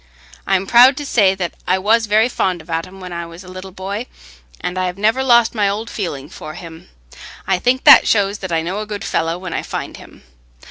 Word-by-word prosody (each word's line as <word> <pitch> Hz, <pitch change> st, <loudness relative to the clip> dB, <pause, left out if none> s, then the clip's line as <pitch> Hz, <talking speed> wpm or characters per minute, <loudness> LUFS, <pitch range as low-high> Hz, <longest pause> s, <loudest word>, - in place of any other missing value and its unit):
I'm 195 Hz, 0 st, +1 dB
proud 250 Hz, +6 st, +6 dB
to 290 Hz, -, -5 dB
say 200 Hz, -8 st, +3 dB
that 180 Hz, -3 st, -4 dB
I 185 Hz, -, +2 dB
was 220 Hz, +4 st, +2 dB
very 215 Hz, +2 st, +3 dB
fond 185 Hz, -7 st, -1 dB
of 170 Hz, -, -12 dB
Adam 185 Hz, +4 st, -4 dB
when 180 Hz, -1 st, -8 dB
I 170 Hz, 0 st, -5 dB
was 170 Hz, +3 st, -12 dB
a -, -, -15 dB
little 185 Hz, +1 st, -9 dB
boy, 200 Hz, +6 st, -5 dB, 0.5 s
and 180 Hz, -, -4 dB
I 185 Hz, 0 st, -1 dB
have 180 Hz, +1 st, -5 dB
never 220 Hz, +6 st, +1 dB
lost 235 Hz, -3 st, +4 dB
my 205 Hz, -3 st, +1 dB
old 215 Hz, +3 st, -4 dB
feeling 145 Hz, -9 st, -5 dB
for 155 Hz, 0 st, -10 dB
him—I 160 Hz, -, -7 dB
think 250 Hz, +5 st, +1 dB
that -, -, +8 dB
shows 205 Hz, -1 st, +1 dB
that 185 Hz, -2 st, -6 dB
I 165 Hz, -1 st, 0 dB
know 185 Hz, +5 st, -3 dB
a 215 Hz, -, -5 dB
good 205 Hz, -1 st, -6 dB
fellow 165 Hz, +1 st, -1 dB
when 185 Hz, -1 st, -7 dB
I -, -, -2 dB
find -, -, -6 dB
him. -, -, -16 dB
190 Hz, 225 wpm, -18 LUFS, 175-215 Hz, 0.5 s, that